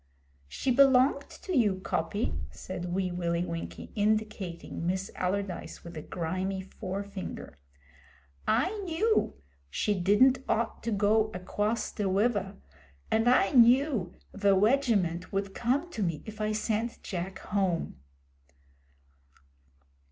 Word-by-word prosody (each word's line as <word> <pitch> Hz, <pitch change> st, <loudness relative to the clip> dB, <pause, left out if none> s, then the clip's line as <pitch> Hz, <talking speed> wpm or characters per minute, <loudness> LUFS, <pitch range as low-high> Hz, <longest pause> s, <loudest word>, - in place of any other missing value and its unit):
'She 255 Hz, -, -1 dB
belonged 270 Hz, +2 st, +5 dB
to 370 Hz, -, -5 dB
you, 215 Hz, -7 st, +4 dB
Coppy,' 190 Hz, +3 st, -2 dB, 0.2 s
said 180 Hz, -1 st, -6 dB
Wee 185 Hz, 0 st, 0 dB
Willie 170 Hz, 0 st, -1 dB
Winkie, 170 Hz, -1 st, -6 dB
indicating 210 Hz, -6 st, -1 dB
Miss 190 Hz, +2 st, -1 dB
Allardyce 190 Hz, 0 st, -3 dB
with 170 Hz, 0 st, -9 dB
a 155 Hz, -, -5 dB
grimy 185 Hz, +4 st, -3 dB
forefinger. 190 Hz, -, -6 dB, 0.9 s
'I 365 Hz, -, +2 dB
knew 390 Hz, -, +1 dB, 0.3 s
she 210 Hz, -, 0 dB
didn't 210 Hz, +8 st, +4 dB
ought 225 Hz, 0 st, 0 dB
to 230 Hz, -, -2 dB
go 215 Hz, +1 st, +3 dB
acwoss 210 Hz, +5 st, -2 dB
ve 210 Hz, -, -2 dB
wiver, 200 Hz, 0 st, +1 dB, 0.6 s
and 225 Hz, +2 st, +3 dB
I 195 Hz, -6 st, +4 dB
knew 245 Hz, -, +4 dB, 0.2 s
ve 200 Hz, -1 st, +3 dB
wegiment 200 Hz, -5 st, +2 dB
would 195 Hz, 0 st, -2 dB
come 275 Hz, -, 0 dB
to 225 Hz, -, -4 dB
me 170 Hz, -6 st, -1 dB
if 215 Hz, 0 st, -8 dB
I 215 Hz, 0 st, 0 dB
sent 220 Hz, +2 st, -2 dB
Jack 185 Hz, 0 st, -4 dB
home.' 190 Hz, -5 st, -1 dB
205 Hz, 120 wpm, -29 LUFS, 185-235 Hz, 0.9 s, belonged